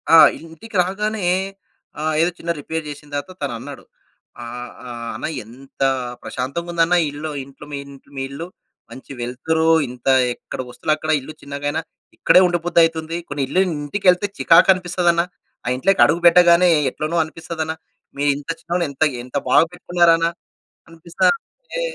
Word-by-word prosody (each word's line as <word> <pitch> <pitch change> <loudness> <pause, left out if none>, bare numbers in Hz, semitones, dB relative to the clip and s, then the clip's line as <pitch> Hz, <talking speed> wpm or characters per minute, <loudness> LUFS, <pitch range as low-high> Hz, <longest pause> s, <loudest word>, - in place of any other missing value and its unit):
ఆ! - - +10 0.2
ఇంటికి 165 +7 -12
రాగానే 210 +2 -2 0.7
ఆహ్, 155 +1 0
ఏదో 175 +2 +2
చిన్న 170 - -2
రిపేర్ 160 +2 -4
జేసిన 145 0 -10
తరువాత 145 +6 -4
తనన్నాడు. 135 +2 -6 0.6
ఆహ్, 120 +1 -7 0.2
ఆహ్, 120 -1 -6
"అన్న - - -4 0.2
ఎంత 135 +4 -15 0.4
ప్రశాంతంగుందన్న 170 +6 -1 0.2
ఇల్లు 150 +2 -5
ఇంట్లో 140 +1 -14
మీ - - -2
ఇంట్ 140 -1 -15
మీ 135 - -2
ఇల్లు. 165 +5 -6 0.4
మంచి 130 +3 -11
వెల్తురు 145 +7 -1 0.2
ఇంత 125 +1 -10 0.3
ఎక్కడ 130 - -7
వస్తువులక్కడ 155 +5 -1
ఇల్లు 155 +4 -9
చిన్నగైనా 145 +2 -3 0.4
ఇక్కడే 180 - +6
ఉండ 175 0 +1
బుద్ధయితుంది. 165 -1 +2
కొన్ని 145 -1 -2
ఇల్లు 185 +7 +2 0.2
ఇంటికెళ్తే 180 +4 +2
చికాకనిపిస్తదన్న 175 0 +4 0.4
ఆ - - -7
ఇంట్లోకడుగు 170 +1 +3
పెట్టగానే 175 +1 +7 0.2
ఎట్లనో 155 +5 -4
అనిపిస్తదన. 160 0 -5 0.5
మీరు 145 +1 +1
ఇంత 145 +2 -11
చిన్నగున్నా 170 +1 -1
ఎంత 140 - 0 0.2
ఎంత 125 +3 -4
బాగా - - +6
పెట్టుకున్నారన. 175 -2 +3 0.6
అనిపిస్తా" 165 +1 -2 0.4
అంటే - - -6
160 Hz, 135 wpm, -20 LUFS, 140-175 Hz, 0.7 s, ఆ